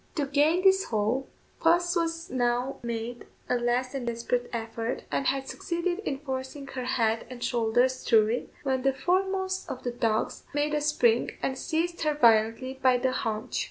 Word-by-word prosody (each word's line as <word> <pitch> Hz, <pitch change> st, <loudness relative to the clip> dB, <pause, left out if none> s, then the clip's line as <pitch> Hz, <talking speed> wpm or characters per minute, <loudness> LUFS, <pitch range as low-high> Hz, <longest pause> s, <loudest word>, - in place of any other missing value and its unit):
To 295 Hz, -4 st, 0 dB
gain 300 Hz, +6 st, +2 dB
this 385 Hz, 0 st, +5 dB
hole, 225 Hz, +5 st, -1 dB, 0.3 s
puss 335 Hz, 0 st, +1 dB
now 245 Hz, +1 st, 0 dB
made 235 Hz, 0 st, -5 dB, 0.2 s
a 250 Hz, -, +1 dB
last 245 Hz, +2 st, 0 dB
and 260 Hz, -3 st, -4 dB
desperate 235 Hz, +1 st, -1 dB
effort, 230 Hz, 0 st, -3 dB
and 275 Hz, -, 0 dB
had 270 Hz, 0 st, 0 dB
succeeded 345 Hz, +4 st, -2 dB
in 285 Hz, -10 st, -3 dB
forcing 265 Hz, 0 st, -5 dB
her 255 Hz, -2 st, -4 dB
head 225 Hz, -3 st, 0 dB
and 245 Hz, -2 st, -7 dB
shoulders 245 Hz, +2 st, +1 dB
through 220 Hz, -2 st, +5 dB
it, 240 Hz, +2 st, -3 dB
when 265 Hz, -2 st, 0 dB
the 270 Hz, +1 st, +2 dB
foremost 375 Hz, +4 st, 0 dB
of 255 Hz, -, -6 dB
the 245 Hz, -, -1 dB
dogs 225 Hz, -2 st, -1 dB
made 295 Hz, +1 st, +1 dB
a 300 Hz, -, +1 dB
spring 245 Hz, -6 st, +2 dB
and 265 Hz, -, 0 dB
seized 340 Hz, +4 st, -2 dB
her 305 Hz, -2 st, +1 dB
violently 235 Hz, +1 st, +3 dB
by 255 Hz, -1 st, +5 dB
the 255 Hz, +1 st, +1 dB
haunch. 220 Hz, -4 st, -2 dB
260 Hz, 170 wpm, -28 LUFS, 240-300 Hz, 0.3 s, this